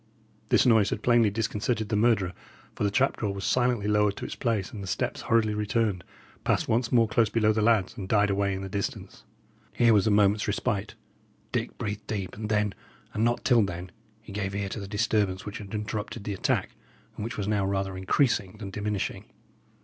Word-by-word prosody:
This -, -, +4 dB
noise 110 Hz, -5 st, +5 dB
had 105 Hz, -, -3 dB
plainly 120 Hz, -3 st, +4 dB
disconcerted 110 Hz, +1 st, -1 dB
the 105 Hz, -, 0 dB
murderer, 105 Hz, -4 st, +2 dB, 0.4 s
for -, -, -4 dB
the 100 Hz, -, +3 dB
trap 135 Hz, +7 st, +2 dB
door 100 Hz, -3 st, -2 dB
was 100 Hz, -, -5 dB
silently 120 Hz, -4 st, +1 dB
lowered 105 Hz, -1 st, +2 dB
to -, -, -5 dB
its -, -, -5 dB
place, 115 Hz, -7 st, -1 dB
and 105 Hz, -, -7 dB
the 95 Hz, -, -6 dB
steps -, -, -2 dB
hurriedly 110 Hz, -2 st, +2 dB
returned, 105 Hz, -2 st, 0 dB, 0.4 s
passed -, -, +1 dB
once 115 Hz, +1 st, +1 dB
more 115 Hz, -2 st, +4 dB
close 110 Hz, 0 st, +2 dB
below 110 Hz, -1 st, +2 dB
the 110 Hz, -, 0 dB
lads, 110 Hz, -4 st, +2 dB
and 95 Hz, -5 st, -6 dB
died 105 Hz, -2 st, +3 dB
away 100 Hz, 0 st, +1 dB
in 95 Hz, -, -5 dB
the -, -, -4 dB
distance. 100 Hz, +1 st, -5 dB, 0.5 s
Here 120 Hz, -1 st, +4 dB
was 105 Hz, 0 st, +4 dB
a -, -, +4 dB
moment's 105 Hz, 0 st, +3 dB
respite. 105 Hz, -1 st, -1 dB, 0.6 s
Dick -, -, -2 dB
breathed 105 Hz, 0 st, -4 dB
deep, 100 Hz, -4 st, -4 dB
and 105 Hz, 0 st, -5 dB
then, 105 Hz, -2 st, +1 dB, 0.4 s
and 110 Hz, -, 0 dB
not 120 Hz, +1 st, +1 dB
till 120 Hz, -3 st, +5 dB
then, 90 Hz, -2 st, -3 dB, 0.3 s
he 110 Hz, -, -11 dB
gave 100 Hz, -1 st, -3 dB
ear 100 Hz, -1 st, -2 dB
to 110 Hz, -, -5 dB
the 100 Hz, -, -6 dB
disturbance 105 Hz, -2 st, 0 dB
which 105 Hz, -, -6 dB
had 100 Hz, -2 st, -9 dB
interrupted 105 Hz, +1 st, -4 dB
the 105 Hz, -, -3 dB
attack, 95 Hz, -, 0 dB, 0.4 s
and -, -, -5 dB
which 115 Hz, -, -5 dB
was 100 Hz, -2 st, -2 dB
now 105 Hz, -2 st, +1 dB
rather 95 Hz, -1 st, -1 dB
increasing 100 Hz, +1 st, +1 dB
than 100 Hz, -2 st, -7 dB
diminishing. 105 Hz, -1 st, -3 dB
105 Hz, 205 wpm, -27 LUFS, 100-110 Hz, 0.6 s, noise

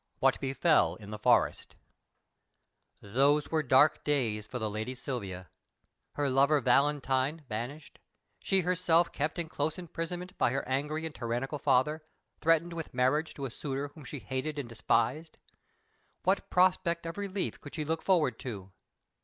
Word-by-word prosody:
What -, -, +2 dB
befell 135 Hz, -, +2 dB
in 100 Hz, +2 st, -11 dB
the 105 Hz, -, -6 dB
Forest -, -, +2 dB, 1.3 s
Those 140 Hz, +8 st, +2 dB
were 160 Hz, -1 st, +2 dB
dark 140 Hz, +2 st, +4 dB
days 115 Hz, -8 st, 0 dB
for 125 Hz, -, -5 dB
the 110 Hz, -2 st, -1 dB
lady 110 Hz, +5 st, -4 dB
Silvia: 100 Hz, -9 st, -5 dB, 0.7 s
her 145 Hz, -1 st, 0 dB
lover 140 Hz, +3 st, +4 dB
Valentine 140 Hz, +2 st, +2 dB
banished, 125 Hz, +8 st, -6 dB, 0.4 s
she 190 Hz, -1 st, +2 dB
herself 175 Hz, -1 st, +2 dB
kept 150 Hz, +4 st, -2 dB
in 170 Hz, -2 st, -2 dB
close 155 Hz, +1 st, -2 dB
imprisonment 175 Hz, +1 st, -5 dB
by -, -, +4 dB
her 135 Hz, -2 st, -2 dB
angry 150 Hz, +4 st, -1 dB
and 160 Hz, -, -5 dB
tyrannical 125 Hz, +4 st, -3 dB
father, 145 Hz, +4 st, +2 dB, 0.4 s
threatened 165 Hz, +1 st, +2 dB
with 165 Hz, -6 st, -6 dB
marriage 130 Hz, +5 st, +1 dB
to 140 Hz, -, -4 dB
a 130 Hz, -, -5 dB
suitor 140 Hz, +2 st, -4 dB
whom 150 Hz, +1 st, -14 dB
she 140 Hz, +3 st, -7 dB
hated 130 Hz, +7 st, -4 dB
and 140 Hz, -4 st, -4 dB
despised. 115 Hz, +7 st, 0 dB, 0.9 s
What 190 Hz, +2 st, +1 dB
prospect 180 Hz, -2 st, +2 dB
of 165 Hz, +4 st, -5 dB
release 200 Hz, -1 st, -3 dB
could 145 Hz, -, -11 dB
she 155 Hz, -2 st, -3 dB
look 160 Hz, +2 st, -1 dB
forward 155 Hz, -, +2 dB
to? 100 Hz, -7 st, -6 dB
145 Hz, 155 wpm, -30 LUFS, 125-160 Hz, 1.3 s, dark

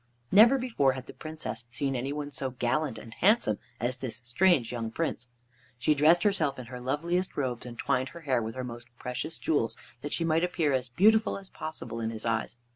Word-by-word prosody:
Never 230 Hz, +7 st, +8 dB
before 225 Hz, -, +2 dB
had 130 Hz, -1 st, -7 dB
the -, -, -10 dB
Princess 140 Hz, -8 st, -6 dB
seen 135 Hz, +2 st, -1 dB
any 130 Hz, +3 st, -2 dB
one 145 Hz, 0 st, -4 dB
so 135 Hz, -1 st, -2 dB
gallant 130 Hz, +2 st, -1 dB
and 115 Hz, -, -10 dB
handsome 190 Hz, -, +3 dB, 0.2 s
as 125 Hz, +2 st, -1 dB
this 130 Hz, -3 st, -3 dB
strange 130 Hz, 0 st, +3 dB
young 115 Hz, -2 st, -3 dB
Prince. 125 Hz, -1 st, -2 dB, 0.5 s
She 125 Hz, +5 st, +3 dB
dressed 155 Hz, +5 st, +5 dB
herself 180 Hz, -9 st, +2 dB
in 130 Hz, -, -7 dB
her 125 Hz, -, -5 dB
loveliest 170 Hz, +8 st, -1 dB
robes, 125 Hz, -3 st, -2 dB
and 120 Hz, -1 st, -9 dB
twined 130 Hz, 0 st, 0 dB
her 170 Hz, -, -11 dB
hair 130 Hz, -6 st, +1 dB
with 110 Hz, +1 st, -4 dB
her 130 Hz, -, -3 dB
most 120 Hz, -1 st, -7 dB
precious 125 Hz, +5 st, -4 dB
jewels, 145 Hz, -8 st, 0 dB, 0.2 s
that 145 Hz, -, -5 dB
she 165 Hz, -, +1 dB
might 165 Hz, +1 st, +2 dB
appear 170 Hz, -5 st, +1 dB
as 130 Hz, -1 st, 0 dB
beautiful 215 Hz, -, +4 dB
as 195 Hz, -1 st, -11 dB
possible 125 Hz, -7 st, -6 dB
in 110 Hz, -1 st, -1 dB
his 110 Hz, 0 st, -7 dB
eyes. 115 Hz, 0 st, -1 dB
135 Hz, 205 wpm, -29 LUFS, 120-165 Hz, 0.5 s, Never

